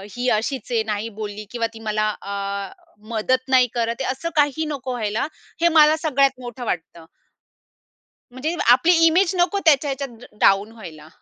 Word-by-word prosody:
ही 245 +1 -2
अशीच 235 +3 -2
आहे 230 -2 +2
नाही 215 +1 -3
बोलली 210 0 -6
किंवा 230 -2 -1
ती 225 - -11
मला 215 0 +1
अ, 200 0 -4 0.4
मदत 255 +4 0
नाही 255 -1 +5
करत 235 +1 -2
आहे." - - -2
असं 300 +6 -4
काही 295 +1 +2
नको 275 -4 -5
व्हायला. 220 0 -2 0.3
हे 340 - +5
मला 305 0 +7
सगळ्यात 275 -4 +1
मोठं 245 0 -7
वाटतं. 165 -3 -5 1.3
म्हणजे 290 +7 -3 0.2
आपली 260 +8 +5
इमेज 355 +3 +3
नको 370 +3 +2
त्याच्या 290 -2 +4
ह्याच्यात 270 -3 -5
ड - - -13 0.2
डाउन 200 +3 +4
व्हायला. 165 -9 -11
245 Hz, 165 wpm, -22 LUFS, 215-280 Hz, 1.3 s, मला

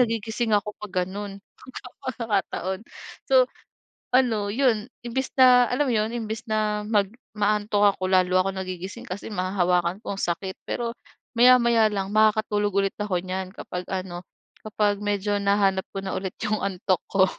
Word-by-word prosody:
nagigising 225 -1 0
ako 210 +1 -3
pag 185 -3 -2
gano’n 200 +1 -7
mga - - -39 0.5
pagkakataon. 205 -5 -2 0.5
So - - +5 0.6
ano, 220 -6 +2
yun, 235 -3 +1 0.2
imbes 260 +3 -3
na 250 -1 +8
alam 280 +2 +1
mo 245 - +1
yun, 215 +1 0
imbes 225 -1 -4
na 210 -1 0
mag 205 -3 +2 0.3
ma-aantok 205 -1 +2
ako, 185 0 -2
lalo 185 0 +4
ako 195 - 0
nagigising, 190 +4 -6
kasi 200 +4 -6
mahahawakan 180 -1 0
ko, - - -3
ang - - -6
sakit. 190 +2 -2 0.2
Pero, 235 -1 -2 0.4
maya-maya 235 -2 +6
lang, 200 -1 -3
makakatulog 215 -1 +2
ulit 195 - -2
ako 195 -4 0
‘nyan 185 0 -3
kapag 180 0 -6
ano, 185 -2 -4 0.4
kapag 210 -1 0
medyo 205 0 0
nahanap 200 -1 +2
ko - - -1
na 190 - -3
ulit 190 -1 -4
yung 215 0 0
antok 185 -2 0
ko. 190 -1 +4
205 Hz, 155 wpm, -25 LUFS, 190-220 Hz, 0.6 s, na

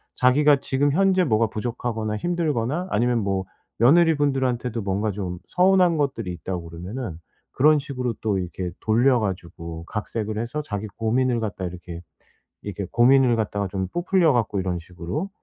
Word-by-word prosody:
자기가 145 +3 +4
지금 140 +1 +1
현재 190 +2 +3
뭐가 115 -5 +2
부족하거나 110 -1 -3
힘들거나 160 - -1
아니면 120 +2 +2
뭐 95 -2 -1 0.3
며느리분들한테도 135 -5 +3
뭔가 100 +2 -1
좀 95 -3 -4
서운한 180 -2 +4
것들이 130 -10 -1
있다 90 +1 -4
그러면은 85 +4 -6 0.3
그런 150 +3 +4
식으로 125 -4 -3
또 105 -3 0
이렇게 90 0 -4
돌려 120 +4 +3
가지고 85 -5 -5
각색을 110 +1 -4
해서 120 +7 -3
자기 105 -5 -4
고민을 120 +2 +1
갖다 105 -4 -4
이렇게 85 -1 -7 0.6
이렇게 100 -2 -5
고민을 125 0 +5
갖다가 105 -2 -1
좀 95 0 -2
부풀려 175 - +2
갖고 110 -5 0
이런 90 -2 -2
식으로 90 - -5
115 Hz, 365 characters per minute, -24 LUFS, 95-140 Hz, 0.6 s, 고민을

